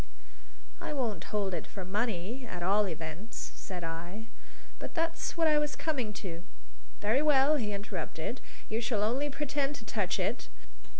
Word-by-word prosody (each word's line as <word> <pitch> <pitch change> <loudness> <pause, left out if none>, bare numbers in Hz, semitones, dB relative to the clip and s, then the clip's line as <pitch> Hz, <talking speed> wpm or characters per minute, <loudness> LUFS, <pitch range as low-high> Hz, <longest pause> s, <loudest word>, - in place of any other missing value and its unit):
"I - - -2
won't 240 -7 0
hold 200 -3 0
it - - -2
for 190 -3 -6
money, 210 +4 0
at 175 -5 -4
all 200 +3 +5
events," 165 +5 -4
said 180 -2 -5
I. 170 +6 -4 0.5
"But - - -6
that's 330 0 0
what 325 -1 +5
I 305 -1 +6
was 295 0 0
coming 265 -9 0
to." 170 -2 -4 0.6
"Very 220 +7 +4
well!" 295 0 +6
he 215 -6 0
interrupted. 200 +1 -3 0.3
"You 220 +2 0
shall 225 -3 +2
only 260 +7 +2
pretend 285 0 0
to - - -8
touch - - +1
it. - - 0
220 Hz, 160 wpm, -32 LUFS, 190-280 Hz, 0.6 s, I